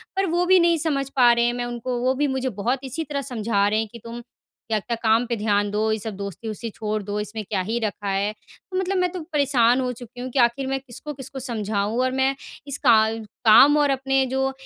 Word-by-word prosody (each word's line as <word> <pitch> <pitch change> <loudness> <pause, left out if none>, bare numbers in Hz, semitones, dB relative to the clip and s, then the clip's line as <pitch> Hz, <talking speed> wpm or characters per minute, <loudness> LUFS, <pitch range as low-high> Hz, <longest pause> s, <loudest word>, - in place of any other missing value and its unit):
पर 390 0 +1
वो 350 +2 +1
भी 375 0 +6
नहीं 340 -1 +3
समझ 285 -4 0
पा 245 -3 +6
रहे 235 0 +2
हैं 240 - +1
मैं 245 0 -3
उनको 240 +1 -4
वो 255 +1 +1
भी 290 +2 +1
मुझे 265 -1 -1
बहुत 235 +5 -1
इसी 270 +5 -2
तरह 280 -2 -3
समझा 220 -6 0
रहे 215 +1 +1
हैं। 220 - -2
कि 235 - -10
तुम 235 +1 -7
क्या-क्या 230 -1 -6
काम 225 +2 +3
पे 235 -1 -2
ध्यान 205 -1 0
दो 215 +1 0
ये 220 - 0
सब 215 0 -4
दोस्ती 200 +2 -7
वोस्ती 225 +2 -4
छोड़ 215 0 -3
दो 205 +1 -3
इसमें 215 +1 -4
क्या 195 -3 0
ही 225 +5 -2
रखा 205 -2 -3
है। 195 +2 0
तो 370 -1 -10
मतलब 380 +1 0
मैं 360 0 +2
तो 365 - -5
परेशान 255 -4 +3
हो 250 -1 -1
चुकी 245 +1 -11
हूँ 255 - -4
कि 265 - 0
आख़िर 240 +3 +2
मैं 270 0 -1
किसको-किसको 270 +1 -7
समझाऊँ? 220 -2 -2
और 255 0 +1
मैं 265 +1 +1 0.3
इस 280 -1 -1
का 230 - +8 0.5
काम 265 +7 +8
और 295 -1 +3
अपने 270 0 +1
जो 265 +1 -1
240 Hz, 240 wpm, -23 LUFS, 220-270 Hz, 0.5 s, का